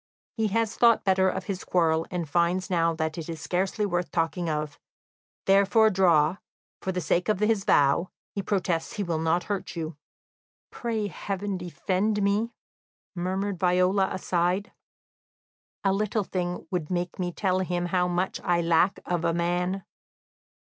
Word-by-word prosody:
"He 220 Hz, -2 st, +1 dB
has 225 Hz, +1 st, 0 dB
thought 235 Hz, -2 st, +5 dB
better 190 Hz, -1 st, +3 dB
of 190 Hz, +1 st, -3 dB
his 195 Hz, -1 st, -4 dB
quarrel, 165 Hz, -2 st, +1 dB
and 175 Hz, -3 st, -3 dB
finds 175 Hz, +4 st, +1 dB
now 165 Hz, -2 st, +2 dB
that 160 Hz, 0 st, -2 dB
is 165 Hz, 0 st, -6 dB
scarcely 185 Hz, +6 st, -1 dB
worth 175 Hz, -3 st, -1 dB
talking 165 Hz, +1 st, -1 dB
of; 150 Hz, -1 st, -3 dB, 0.7 s
therefore 200 Hz, +3 st, +5 dB
draw, 175 Hz, -3 st, +4 dB, 0.4 s
for 190 Hz, -, -2 dB
the 180 Hz, -, -2 dB
sake 175 Hz, +4 st, 0 dB
of 210 Hz, -, +2 dB
his 210 Hz, -2 st, +1 dB
vow; 145 Hz, +5 st, +3 dB, 0.2 s
he 200 Hz, -, -2 dB
protests 180 Hz, -4 st, -1 dB
he 205 Hz, -, -2 dB
will 170 Hz, -4 st, -1 dB
not 165 Hz, +2 st, +1 dB
hurt 200 Hz, 0 st, -4 dB
you." 160 Hz, -2 st, -5 dB, 0.7 s
"Pray 225 Hz, -3 st, -2 dB
heaven 200 Hz, +1 st, -4 dB
defend 190 Hz, +4 st, -1 dB
me," 205 Hz, +4 st, +1 dB, 0.6 s
murmured 190 Hz, +1 st, -2 dB
Viola 185 Hz, +2 st, +3 dB
aside. 180 Hz, +2 st, 0 dB, 1.1 s
"A 195 Hz, -1 st, +3 dB
little 215 Hz, +2 st, 0 dB
thing 180 Hz, -1 st, -3 dB
would 175 Hz, -5 st, -2 dB
make 175 Hz, 0 st, -2 dB
me 180 Hz, -1 st, -1 dB
tell 185 Hz, 0 st, 0 dB
them 175 Hz, -1 st, -1 dB
how 180 Hz, 0 st, +1 dB
much 180 Hz, +2 st, -1 dB
I 175 Hz, -1 st, +2 dB
lack 170 Hz, +3 st, +2 dB
of 175 Hz, -2 st, -1 dB
a 170 Hz, -1 st, +1 dB
man." 180 Hz, +2 st, 0 dB
180 Hz, 155 wpm, -27 LUFS, 170-195 Hz, 1.1 s, thought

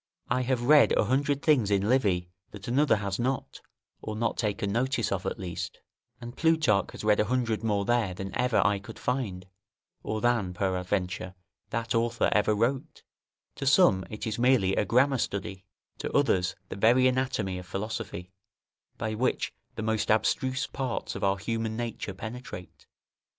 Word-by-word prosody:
I 125 Hz, +1 st, +1 dB
have 125 Hz, -1 st, 0 dB
read 145 Hz, +3 st, +6 dB
a -, -, +3 dB
hundred 140 Hz, +5 st, 0 dB
things 130 Hz, -10 st, +3 dB
in 100 Hz, 0 st, +1 dB
Livy 95 Hz, -8 st, +1 dB, 0.2 s
that 105 Hz, -1 st, -10 dB
another 140 Hz, +3 st, +3 dB
has 100 Hz, -1 st, -3 dB
not, 130 Hz, +2 st, -2 dB, 0.4 s
or 110 Hz, -, -5 dB
not 115 Hz, +2 st, -1 dB
taken 100 Hz, -3 st, -1 dB
notice 125 Hz, +1 st, 0 dB
of 95 Hz, -1 st, -2 dB
at -, -, -3 dB
least; 85 Hz, -3 st, -5 dB, 0.4 s
and 120 Hz, +1 st, -8 dB
Plutarch 160 Hz, -12 st, +2 dB
has -, -, -8 dB
read 105 Hz, -1 st, +3 dB
a 105 Hz, -, +3 dB
hundred 120 Hz, -2 st, -1 dB
more 105 Hz, -3 st, 0 dB
there 115 Hz, -6 st, +1 dB
than 95 Hz, +1 st, -6 dB
ever 125 Hz, -1 st, +2 dB
I 100 Hz, -1 st, +2 dB
could 100 Hz, -, -11 dB
find, 105 Hz, -8 st, -2 dB, 0.6 s
or 110 Hz, +1 st, -3 dB
than, 115 Hz, -6 st, +1 dB
peradventure, 90 Hz, -1 st, -2 dB, 0.3 s
that 115 Hz, 0 st, -2 dB
author 115 Hz, 0 st, +1 dB
ever 105 Hz, 0 st, +3 dB
wrote; 130 Hz, +8 st, -1 dB, 0.5 s
to 135 Hz, -, -3 dB
some 135 Hz, -, +5 dB
it 105 Hz, -, -6 dB
is 110 Hz, 0 st, -3 dB
merely 120 Hz, -7 st, +3 dB
a -, -, +1 dB
grammar 130 Hz, +3 st, +3 dB
study, 95 Hz, -2 st, -4 dB, 0.3 s
to -, -, -4 dB
others 95 Hz, -10 st, +2 dB
the -, -, -5 dB
very 120 Hz, +6 st, +4 dB
anatomy 125 Hz, -8 st, 0 dB
of 90 Hz, -, -11 dB
philosophy, 100 Hz, -1 st, -5 dB, 0.7 s
by 110 Hz, 0 st, -2 dB
which 120 Hz, +4 st, -1 dB, 0.2 s
the -, -, -4 dB
most 110 Hz, -1 st, 0 dB
abstruse 130 Hz, +4 st, +1 dB
parts 130 Hz, -3 st, -3 dB
of -, -, -6 dB
our 100 Hz, 0 st, +2 dB
human 110 Hz, +2 st, -3 dB
nature 115 Hz, -4 st, -4 dB
penetrate. 110 Hz, -4 st, -8 dB
110 Hz, 165 wpm, -28 LUFS, 100-125 Hz, 0.7 s, read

